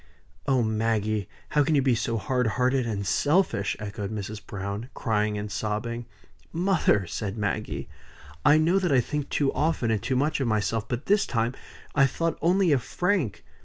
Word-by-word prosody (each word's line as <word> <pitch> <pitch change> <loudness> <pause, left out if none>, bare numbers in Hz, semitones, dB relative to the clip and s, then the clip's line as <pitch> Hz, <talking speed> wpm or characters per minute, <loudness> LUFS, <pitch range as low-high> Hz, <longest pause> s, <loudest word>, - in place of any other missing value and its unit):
"Oh 130 -3 +3
Maggie! 110 -2 0 0.2
how 150 - +3
can 155 +2 +2
you 140 - +4
be 130 -2 +3
so 115 0 -1
hard 125 +4 0
hearted 125 0 +2
and 100 -3 -2
selfish?" 145 - +1
echoed 100 -1 -5
Mrs. 105 -1 -5
Browne, 100 +4 -5
crying 105 -2 0
and 105 0 -5
sobbing. 110 +3 -3 0.4
"Mother!" 170 - +2
said 100 +4 -4
Maggie, 105 -4 -2 0.6
"I 145 +1 +6
know 170 +5 +3
that 180 -4 0
I 135 - +5
think 145 +4 -2
too 140 -2 +1
often 150 -7 +1
and 110 -3 0
too 130 - -1
much 145 +4 +1
of 130 - +1
myself. 110 0 0
But 120 +3 -3
this 205 0 +3
time 115 0 0 0.4
I 140 -2 +5
thought 165 +5 -2
only 180 0 +3
of 135 -4 +3
Frank. 175 - -1
115 Hz, 175 wpm, -26 LUFS, 105-145 Hz, 0.6 s, I